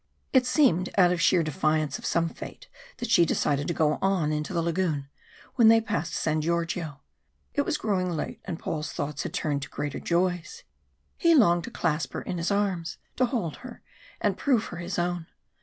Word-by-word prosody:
It 255 -2 +4
seemed 185 - +3
out 180 -2 +6
of 175 -1 0
sheer 175 0 +4
defiance 155 -1 0
of - - -5
some 170 0 +2
fate - - -9 0.3
that 240 -2 -4
she 175 - +6
decided 145 -3 +1
to 170 - 0
go 155 -1 +2
on 190 -6 +1
into 150 +2 -2
the 170 -2 0
lagoon 165 -5 -1 0.5
when 235 -3 +7
they 225 0 +7
passed 170 -7 -2
San 155 0 0
Georgio. 165 -3 -2 0.5
It 285 - +1
was 300 - 0
growing 195 -8 0
late, 165 -3 -4
and 165 - -4
Paul's 155 -1 -4
thoughts 145 0 -3
had - - -5
turned 145 -2 -1
to 140 - -6
greater 145 -1 -4
joys. 180 - -1 0.5
He 335 -2 +4
longed 175 - +4
to - - -6
clasp 160 -8 -1
her - - -4
in 180 - -4
his 170 - -1
arms, 195 -5 -1 0.2
to 255 - +4
hold 225 - -2
her, 250 -1 -11 0.4
and - - +1
prove 250 -6 +2
her - - -5
his 175 +2 -4
own. 175 -1 -1
170 Hz, 195 wpm, -27 LUFS, 155-200 Hz, 0.5 s, when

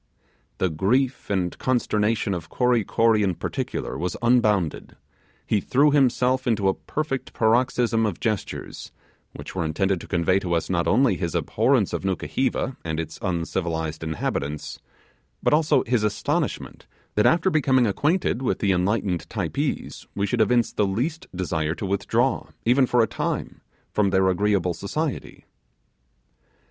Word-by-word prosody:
The 95 - 0
grief 125 - 0
and 90 -3 -1
consternation 110 -4 0
of 85 -3 -5
Kory 125 -3 +2
Kory, 115 +2 +2
in 95 -3 +1
particular, - - -4
was 90 +1 -2
unbounded; 105 -9 +1 0.5
he 105 - +1
threw 145 +8 +3
himself 130 -2 +2
into 105 -4 +1
a 95 - +3
perfect 150 +1 -4
paroxysm 115 -1 +2
of 95 -5 -4
gestures 110 -5 -4 0.4
which - - -9
were 90 - -1
intended 95 +4 0
to - - -10
convey 90 +1 +2
to 90 -3 -1
us 85 - -2
not 85 -2 +1
only 130 +3 +3
his 85 -3 -3
abhorrence - - +1
of - - -2
Nukuheva 125 +7 -1
and 80 -1 -3
its 80 -1 -5
uncivilized 85 -3 -2
inhabitants, 75 -2 -3 0.6
but - - +3
also 150 -3 +3
his 115 -2 0
astonishment 105 - -2 0.3
that 105 - +3
after 175 +3 +3
becoming 130 -5 +3
acquainted 145 - 0
with 130 - 0
the 100 -3 +1
enlightened 95 -1 0
Typees, - - -3
we 100 - 0
should 100 - 0
evince 120 +2 +2
the 105 - +1
least 130 - -2
desire 80 -3 -1
to 100 - -5
withdraw, 115 +6 0 0.2
even 125 +3 +4
for 120 -1 +3
a - - +1
time, - - -3 0.3
from 105 -2 +2
their 95 0 +3
agreeable 95 -1 +1
society. 145 - -4
105 Hz, 145 wpm, -24 LUFS, 90-125 Hz, 0.6 s, even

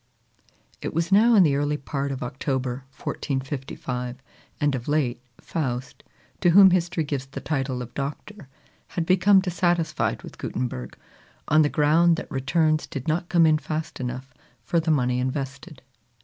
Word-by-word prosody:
It - - -5
was 165 +2 0
now 225 +4 +6
in 195 - +7
the 145 -4 +3
early 145 +1 0
part 140 0 -3
of 135 - -4
October, 130 0 -3
1455; 130 -2 -4 0.4
and 145 -1 +2
of 125 -2 -4
late, 145 -5 0 0.2
Faust, 130 -5 -4 0.4
to 175 - +3
whom 190 +2 +8
history 175 -2 +1
gives 140 -3 -3
the 135 - -7
title 135 -3 -2
of 120 - -11
Doctor, 145 +5 -6 0.4
had 170 - -3
become 190 +2 +5
dissatisfied 175 -3 0
with - - -11
Gutenberg, 65 - -4 0.5
on 155 +1 +5
the 150 - +3
ground 160 +4 +4
that - - -7
returns 155 +3 +1
did 135 0 -6
not 170 +3 -1
come 170 -2 +5
in 155 -1 +4
fast 155 0 -4
enough 125 +1 -5 0.3
for 170 - +1
the 160 0 -2
money 125 -5 +2
invested. 135 +3 -4
145 Hz, 155 wpm, -25 LUFS, 130-165 Hz, 0.5 s, whom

